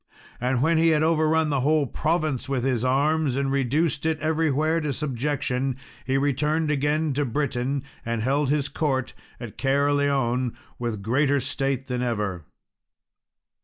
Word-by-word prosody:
And 125 Hz, +1 st, 0 dB
when 160 Hz, +1 st, +3 dB
he 165 Hz, -, +4 dB
had 155 Hz, -1 st, +3 dB
overrun 160 Hz, -1 st, +2 dB
the 140 Hz, -, +1 dB
whole 150 Hz, +2 st, +2 dB
province 155 Hz, -2 st, -1 dB
with 130 Hz, -3 st, -1 dB
his 125 Hz, -3 st, 0 dB
arms, 140 Hz, +2 st, +2 dB
and 135 Hz, 0 st, 0 dB
reduced 145 Hz, +4 st, 0 dB
it 160 Hz, -1 st, 0 dB
everywhere 155 Hz, +1 st, +1 dB
to 150 Hz, -2 st, -1 dB
subjection, 135 Hz, -1 st, -1 dB, 0.3 s
he 135 Hz, +1 st, +2 dB
returned 150 Hz, +3 st, +1 dB
again 150 Hz, +1 st, +1 dB
to 145 Hz, +2 st, 0 dB
Britain, 135 Hz, 0 st, -1 dB, 0.2 s
and 115 Hz, -1 st, -2 dB
held 140 Hz, +2 st, +1 dB
his 145 Hz, -1 st, +1 dB
court 140 Hz, -3 st, -1 dB, 0.3 s
at 120 Hz, -2 st, -9 dB
Caerleon, 135 Hz, -2 st, +1 dB, 0.2 s
with 115 Hz, -4 st, -3 dB
greater 140 Hz, +5 st, +2 dB
state 135 Hz, -1 st, -2 dB
than 125 Hz, -2 st, -3 dB
ever. 105 Hz, -9 st, -2 dB
140 Hz, 145 wpm, -25 LUFS, 130-150 Hz, 0.3 s, he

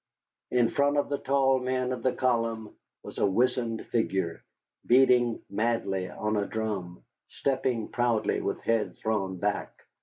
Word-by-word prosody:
In 120 Hz, -2 st, +2 dB
front 145 Hz, +1 st, +2 dB
of 145 Hz, -, +1 dB
the 140 Hz, -, -1 dB
tall 135 Hz, -1 st, +2 dB
men 130 Hz, 0 st, -1 dB
of 125 Hz, -2 st, -3 dB
the 130 Hz, -, +2 dB
column 115 Hz, -3 st, -1 dB, 0.3 s
was -, -, -8 dB
a -, -, +3 dB
wizened 120 Hz, +2 st, 0 dB
figure, 95 Hz, -7 st, -1 dB, 0.4 s
beating 125 Hz, -2 st, +4 dB
madly 100 Hz, -3 st, -1 dB
on 105 Hz, +3 st, -2 dB
a 100 Hz, -1 st, 0 dB
drum, 100 Hz, -6 st, -4 dB, 0.3 s
stepping 130 Hz, -4 st, -1 dB
proudly 120 Hz, -3 st, 0 dB
with -, -, -3 dB
head 115 Hz, -2 st, 0 dB
thrown 95 Hz, -4 st, -2 dB
back. 100 Hz, +3 st, -2 dB
115 Hz, 145 wpm, -28 LUFS, 105-130 Hz, 0.4 s, beating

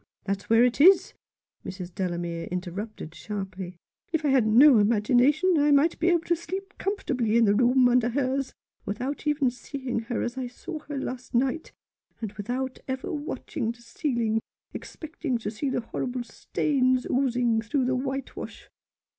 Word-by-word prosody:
that's 195 Hz, 0 st, -3 dB
where 225 Hz, +1 st, +6 dB
it 250 Hz, +3 st, +1 dB
is," 375 Hz, +4 st, +6 dB, 0.5 s
Mrs 185 Hz, -2 st, -7 dB
Delamere 175 Hz, -3 st, -3 dB
inter 180 Hz, 0 st, -3 dB
rupted 200 Hz, -4 st, -7 dB
sharply; 190 Hz, -1 st, -6 dB, 0.2 s
" -, -, -48 dB
if 320 Hz, -2 st, -1 dB
I -, -, +3 dB
had 260 Hz, -5 st, +4 dB
no 245 Hz, +3 st, +7 dB
imagination 250 Hz, -, +3 dB
I 290 Hz, +1 st, +3 dB
might 290 Hz, +3 st, +3 dB
be 335 Hz, -, +1 dB
able 345 Hz, -2 st, +4 dB
to 345 Hz, -, +1 dB
sleep 385 Hz, +4 st, -6 dB
comfortably 255 Hz, -, 0 dB
in 235 Hz, -, +5 dB
the 200 Hz, -, +4 dB
room 250 Hz, +3 st, +4 dB
under 245 Hz, -1 st, +3 dB
hers, 265 Hz, +1 st, -1 dB, 0.3 s
without 255 Hz, +9 st, -4 dB
even 290 Hz, -4 st, +2 dB
seeing 250 Hz, 0 st, -4 dB
her 240 Hz, -, -1 dB
as 240 Hz, +2 st, -3 dB
I 255 Hz, -, -3 dB
saw 310 Hz, +6 st, -7 dB
her 290 Hz, -, -3 dB
last 255 Hz, -1 st, -5 dB
night, 265 Hz, +6 st, 0 dB, 0.5 s
and 220 Hz, -4 st, -4 dB
without 250 Hz, +5 st, -4 dB
ever 260 Hz, +5 st, -3 dB
watching 290 Hz, -5 st, -3 dB
the 235 Hz, 0 st, -19 dB
ceiling, 235 Hz, -4 st, -1 dB, 0.3 s
expecting 315 Hz, -5 st, -4 dB
to 220 Hz, -2 st, -4 dB
see 270 Hz, +6 st, -2 dB
horrible 245 Hz, 0 st, -3 dB
stains 255 Hz, +2 st, 0 dB
oozing 245 Hz, -3 st, +1 dB
through 250 Hz, +4 st, 0 dB
the 260 Hz, +1 st, +1 dB
whitewash. 270 Hz, +1 st, -5 dB
250 Hz, 165 wpm, -26 LUFS, 220-280 Hz, 0.5 s, no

